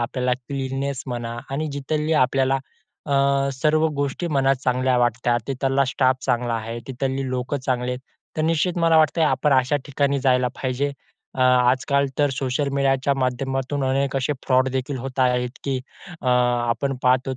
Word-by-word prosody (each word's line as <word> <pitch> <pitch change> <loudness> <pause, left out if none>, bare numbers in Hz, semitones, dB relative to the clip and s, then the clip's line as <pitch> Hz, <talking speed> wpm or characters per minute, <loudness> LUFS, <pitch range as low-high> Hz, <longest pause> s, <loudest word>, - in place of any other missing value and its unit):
आपल्याला 125 +1 -1
क्लीननेस 135 +1 -4
म्हणा 120 -2 -4
आणि 145 +3 -2
जिथली 150 +3 -1
आपल्याला 135 +1 +1 0.5
अ, 140 -1 +2
सर्व 155 +4 +2
गोष्टी 140 +5 -2
मनात 135 -3 +2
चांगल्या 130 0 +2
वाटतात, 120 0 +1
तिथला 135 +1 +1
स्टाफ 130 0 +2
चांगला 120 -1 0
आहे, 115 +1 -4
तिथली 120 +3 -8
जिथली 135 +1 -2
लोकं 130 +3 -2
चांगले 125 -1 0
आहेत 125 - -5 0.4
तर 155 - 0
निश्चित 165 +2 +1
मला 165 -1 +4
वाटत 155 +1 +3
आपण 140 +1 +2
अशा 130 +2 +3
ठिकाणी 140 0 0
जायला 125 -2 +3
पाहिजे. 135 +2 -1 0.4
अ, - - -4
आजकाल 130 +2 +3
तर 145 -1 +3
सोशल 135 +2 -1
मीडियाच्या 135 0 +2
माध्यमातून 135 +1 -1
अनेक 135 +1 0
असे 135 +2 0
फ्रॉडदेखील 130 +1 +1
होत 130 +1 -7
आहेत, 125 -1 +2
की 135 -2 -1 0.4
अ, - - -5
आपण 120 +1 +1
पाहत 130 +1 +3
आहोत 130 - -3
130 Hz, 160 wpm, -23 LUFS, 125-140 Hz, 0.5 s, मला